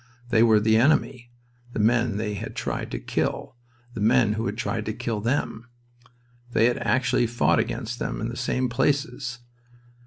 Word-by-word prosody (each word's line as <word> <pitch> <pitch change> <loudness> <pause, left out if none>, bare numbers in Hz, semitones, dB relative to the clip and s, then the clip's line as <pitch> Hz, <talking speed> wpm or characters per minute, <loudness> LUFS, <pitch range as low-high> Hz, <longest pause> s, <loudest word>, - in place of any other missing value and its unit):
They 115 -2 +4
were 110 -2 +6
"the 110 +1 +3
enemy," 125 -1 +2 0.4
the - - -3
men 115 0 +2
they 105 -1 -2
had 100 - -6
tried - - -3
to - - -4
kill, - - -3 0.4
the 110 - -5
men 110 0 +4
who 110 0 -2
had 105 +2 -4
tried 115 -2 -2
to 110 - -1
kill 115 -2 -3
them. 115 -1 -2 0.8
They 115 - +4
had 120 0 +2
actually 125 -1 +1
fought 115 0 +2
against 120 +1 -3
them - - -3
in 110 - -2
the 120 - -6
same 130 +1 -1
places. 125 -1 -1
115 Hz, 175 wpm, -25 LUFS, 110-125 Hz, 0.8 s, were